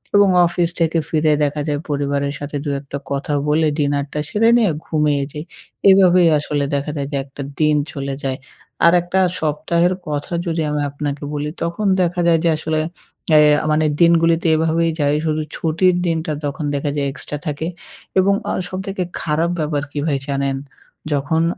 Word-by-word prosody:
এবং 200 -1 +6 0.2
অফিস 170 0 0
থেকে 165 0 +1
ফিরে 155 -1 +2
দেখা 145 +1 -1
যায় 145 -1 -1
পরিবারের 140 0 -1
সাথে 145 0 -4
২ - - -1
একটা 140 0 -6
কথা 140 +1 -2
বলে 155 +1 +3
ডিনারটা 145 0 -1
সেরে 225 +2 +3
নিয়ে 215 -7 +3
ঘুমিয়ে 150 -3 +1
যাই। 150 +1 -6 0.5
এভাবেই 180 -2 +6
আসলে 145 -1 -2
দেখা 140 +2 -2
যায় 140 -1 -2
যে 140 - -1
একটা 140 +1 -10 0.2
দিন 150 -1 +3 0.2
চলে 140 -1 -4
যায়। 135 -1 -2 0.5
আর 170 - +7
একটা 175 +2 -1 0.2
সপ্তাহের 170 +4 +1
কথা 150 +3 -3
যদি 165 -1 -1
আমি 150 0 -1
আপনাকে 145 0 -4
বলি, 150 0 -2
তখন 170 +5 -2 0.2
দেখা 175 0 0
যায় 165 -1 +4
যে 170 - +3
আসলে 155 0 -1 0.5
অ্যা 155 - +7 0.3
আ - - -4
মানে 155 0 +2
দিনগুলিতে 165 0 +4
এভাবেই 165 +1 +1
যাই। 145 0 +2
শুধু 155 0 0
ছুটির 175 +3 +2
দিনটা 160 -2 -1
তখন 145 +1 -3
দেখা 145 +1 -1
যায় 140 -1 0
এক্সট্রা 150 +1 -6
থাকে। 150 +2 -2 0.5
এবং 195 +1 +4 0.2
আ - - -1 0.2
সবথেকে 190 0 -3 0.2
খারাপ 160 +2 0
ব্যাপার 150 -2 -1
কী 145 - -4
ভাই 140 -3 +1
জানেন? 140 -1 -1 0.6
যখন 160 +4 +1
155 Hz, 170 wpm, -19 LUFS, 145-170 Hz, 0.6 s, আর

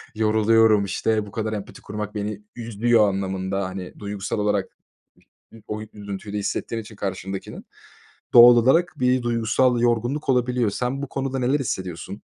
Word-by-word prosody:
Yoruluyorum, 110 -1 +4
işte, 110 +2 0
"Bu 100 - -12
kadar 110 -1 -3
empati 100 -2 -7
kurmak 105 0 -6
beni 105 0 -4
üzüyor." 115 -2 +2
anlamında, 95 0 -2
hani, 95 -1 -7
duygusal 100 0 -4
olarak 105 -2 -1 0.8
ı 110 - -14
o 105 0 -4
üzüntüyle 100 0 -6
hissettiğin 115 +3 -3
için 110 0 -13
karşındakinin 95 -1 -5 0.7
doğal 120 0 +10
olarak 165 +9 +3
bir 125 0 +2
duygusal 120 +1 +1
yorgunluk 120 +5 0
olabiliyor. 125 -3 +1
Sen 125 +6 -3
bu 140 - -4
konuda 135 -1 -3
neler 130 +4 +2
hissediyorsun? 95 -8 -5
110 Hz, 140 wpm, -23 LUFS, 100-120 Hz, 0.8 s, doğal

